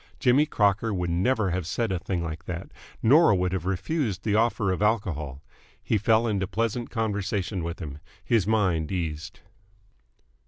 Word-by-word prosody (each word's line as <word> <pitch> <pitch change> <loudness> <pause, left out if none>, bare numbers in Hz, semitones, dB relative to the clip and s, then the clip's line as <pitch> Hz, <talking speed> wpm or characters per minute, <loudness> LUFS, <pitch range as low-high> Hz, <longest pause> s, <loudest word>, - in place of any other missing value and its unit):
Jimmy 135 +4 +4
Crocker 105 0 +1
would 90 -3 -1
never 100 +3 +1
have 90 -2 -2
said 115 +3 -1
a 95 - -1
thing 90 0 -3
like 80 -1 -6
that 85 -1 -6 0.3
nor 140 -1 +6
would 90 -1 0
have 90 -2 -2
refused 100 - -1
the 105 - 0
offer 110 -3 +2
of 95 - -2
alcohol. 80 - -1 0.4
He 110 - +1
fell 110 +2 +3
into 100 -4 0
pleasant 115 +3 -2
conversation 105 -4 -2
with 85 +1 -4
him. 75 -4 -7 0.3
His 105 -1 +2
mind 95 -8 +1
eased. 80 -4 -4
95 Hz, 160 wpm, -26 LUFS, 85-110 Hz, 0.4 s, nor